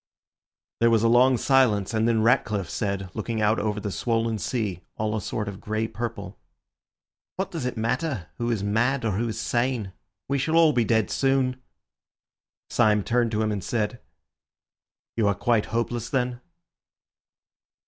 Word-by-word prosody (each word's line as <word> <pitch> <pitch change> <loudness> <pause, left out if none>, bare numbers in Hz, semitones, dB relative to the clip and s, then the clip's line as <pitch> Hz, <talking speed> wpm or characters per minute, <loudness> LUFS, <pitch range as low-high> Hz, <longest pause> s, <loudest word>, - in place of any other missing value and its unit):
There 115 - +5
was 115 -1 +3
a - - +4
long 125 +2 +5
silence, 115 -6 +2
and 110 +1 +2
then 115 -2 +2
Ratcliffe 110 -6 +1
said, 100 -3 -3
looking 110 0 -3
out 110 +1 +2
over 105 0 -1
the 100 0 -4
swollen 115 0 -1
sea, 100 -5 -2 0.2
all 110 0 -1
a 110 - -2
sort 105 +3 -3
of 100 -1 -7
grey 110 +1 -2
purple— 110 -5 -6 1.0
"What 190 - -3
does 155 -7 -3
it 125 - -5
matter 115 - -1
who 120 0 -1
is 110 -4 -1
mad 115 +5 +1
or 110 - +1
who 110 +5 -1
is 110 - -4
sane? 120 -5 -1 0.3
We 140 0 0
shall 155 +4 0
all 165 -2 +6
be 120 -3 +2
dead 110 -1 +1
soon." 135 -1 +1 1.1
Syme 105 -1 +3
turned 120 +1 +1
to 110 +1 +1
him 110 - 0
and 100 -2 -3
said— 115 +1 -2 1.2
"You 110 -3 +3
are 100 - +2
quite 115 +1 +1
hopeless, 115 0 -2
then?" 125 -1 -1
115 Hz, 165 wpm, -25 LUFS, 105-125 Hz, 1.2 s, all